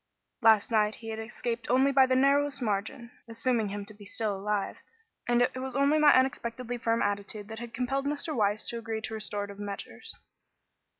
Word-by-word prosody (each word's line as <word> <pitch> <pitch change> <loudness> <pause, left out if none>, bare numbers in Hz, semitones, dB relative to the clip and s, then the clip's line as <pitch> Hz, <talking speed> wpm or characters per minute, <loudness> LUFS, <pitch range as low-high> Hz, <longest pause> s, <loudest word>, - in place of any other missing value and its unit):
Last 220 -1 +5
night 215 -1 +2
he 225 - -9
had 220 0 -4
escaped 230 +1 -4
only 265 +3 +4
by 265 -1 +5
the 255 - +2
narrowest 280 +1 +3
margin 225 +2 -3 0.2
assuming 230 -1 0
him 200 0 -5
to 215 - -12
be 205 0 -14
still 205 +1 -2
alive 200 +1 -2 0.5
and 240 0 +4
it 250 - 0
was 260 -1 -4
only 280 +2 +3
my 300 -1 +7
unexpectedly 245 -2 0
firm 230 0 +1
attitude 205 +1 -3
that 220 0 -6
had 240 -1 -7
compelled 270 +3 -1
Mr. 295 +2 -2
Weiss 210 -2 +1
to 235 - -3
agree 225 -1 -4
to 220 - -5
restorative 205 -2 -3
measures. 200 - -6
230 Hz, 185 wpm, -29 LUFS, 210-255 Hz, 0.5 s, my